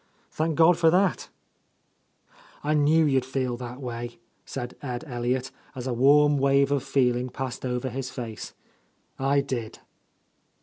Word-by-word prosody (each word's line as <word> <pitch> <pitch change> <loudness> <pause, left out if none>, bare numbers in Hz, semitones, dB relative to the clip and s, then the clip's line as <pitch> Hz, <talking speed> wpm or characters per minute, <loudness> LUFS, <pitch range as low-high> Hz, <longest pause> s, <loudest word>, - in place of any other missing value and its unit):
"Thank 160 0 -1
God 165 +2 +5
for 165 -1 +5
thatl" 190 +4 +2 1.4
"I 150 +1 +1
knew 155 +2 +4
you'd 135 -3 +2
feel 130 -1 -2
that 125 +1 -7
way," 120 -2 -6 0.3
said 125 -2 -6
Ed 125 -3 -4
El 120 -5 -6
liot, 125 +2 -1 0.2
as 125 -1 -6
a 130 - -1
warm 145 +3 +5
wave 140 +1 +3
of 140 -2 +2
feeling 125 -2 +1
passed 130 0 -5
over 125 +1 -2
his 130 +1 -4
face. 115 -5 -7 0.6
"I 140 +1 +2
did!" 120 -5 -4
130 Hz, 145 wpm, -26 LUFS, 125-145 Hz, 1.4 s, God